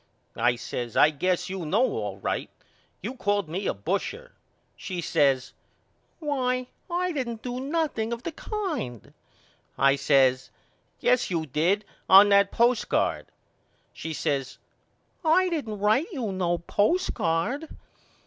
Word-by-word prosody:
I 120 +1 +3
says 120 0 -5
I 150 - +6
guess 180 +4 0
you 190 -1 -4
know 200 +11 +2
all 105 - -3
right. 100 - -3 0.5
You 230 +6 -3
called 205 -7 0
me 185 +5 -3
a - - +1
busher. 200 - -3 0.4
She 185 -2 -5
says 135 -6 +1 0.6
Why 255 -5 -1 0.2
I 360 +1 0
didn't 235 -7 -4
do 245 0 -4
nothing 275 -5 -1
of 235 +1 -4
the 335 - -3
kind. 315 - -5 0.6
I 135 0 +4
says 135 -2 +3 0.5
Yes 250 0 +2
you 165 -3 -1
did 170 +9 +1 0.2
on 195 +2 +9
that 200 0 +5
postcard. 235 -2 +1 0.7
She 160 - -6
says 140 -3 -2 0.7
I 365 +3 +4
didn't 275 -11 -3
write 215 - +2
you 250 - -3
no 175 -2 0
postcard. 210 - 0
205 Hz, 130 wpm, -26 LUFS, 155-260 Hz, 0.7 s, on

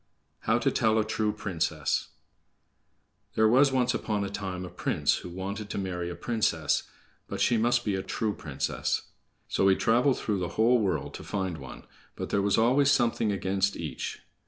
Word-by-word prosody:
How - - +2
to - - +1
Tell 110 0 +2
a 110 - +2
True 110 -1 0
Princess 85 -7 -1 1.3
There 110 - +5
was 135 +5 +5
once 125 -1 +2
upon 105 -2 -1
a 100 - -4
time 95 -2 -4
a - - -7
prince 90 - +1
who - - -8
wanted 100 +4 -5
to - - -4
marry 90 -3 -3
a 85 - -5
princess, 95 -10 0 0.4
but - - -5
she 120 - +3
must 120 +2 +2
be 105 - +1
a 95 - -1
true 105 +2 -2
princess. 70 -7 -2 0.4
So 95 - +2
he 95 - +6
traveled 125 +6 +3
through 105 -3 -1
the 90 -1 -4
whole 120 +3 +5
world 100 -4 -1
to - - -8
find 95 -5 -3
one, 65 -2 -10 0.3
but - - -5
there 100 - +2
was 100 0 +2
always 130 +5 +4
something 115 -5 +2
against 100 0 0
each. - - -5
100 Hz, 180 wpm, -28 LUFS, 95-115 Hz, 1.3 s, he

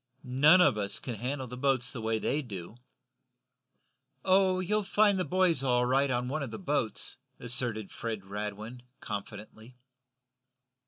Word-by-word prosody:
None 145 +8 +5
of 135 -11 +4
us 100 0 -2
can 125 - -5
handle 130 +5 -3
the 125 0 -8
boats 130 -1 0
the 120 - -5
way 110 0 0
they 145 +7 0
do." 100 - -8 1.5
"Oh, 185 -1 +4
you'll 210 +4 +1
find 200 0 +3
the - - +1
boys 180 -5 +2
all 125 -2 +2
right 135 +3 +2
on 125 -1 0
one 145 +4 -2
of 140 - -3
the 110 - -6
boats," 145 - -2 0.2
asserted 115 -4 -2
Fred 110 -4 -5
Radwin, 105 +4 -6 0.2
confidently. 110 +3 -8
125 Hz, 150 wpm, -30 LUFS, 110-150 Hz, 1.5 s, None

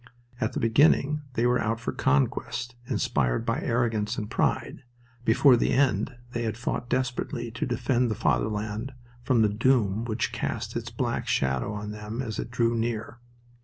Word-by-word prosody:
At 110 +3 -1
the - - -2
beginning 140 +5 +4
they 115 - +2
were 125 0 +3
out 115 +1 -1
for 115 - -3
conquest, 115 - 0
inspired - - 0
by - - 0
arrogance 115 -2 0
and 105 -1 -4
pride. - - 0 0.4
Before 125 +4 +6
the 115 - +1
end 130 -3 +2 0.2
they 120 -2 -1
fought 120 +1 -3
desperately 125 -2 -2
to 115 - -3
defend 125 0 +1
the 110 - -1
Fatherland 110 +3 -1 0.3
from 120 -2 +3
the - - +5
doom 110 -1 +2
which 115 0 -1
cast - - -3
its - - -3
black - - -2
shadow 65 - 0
on 105 0 -5
them 105 +2 -6
as 110 -6 -3
it - - -4
drew 115 -1 +1
near. 115 0 -3
115 Hz, 165 wpm, -27 LUFS, 105-125 Hz, 0.4 s, Before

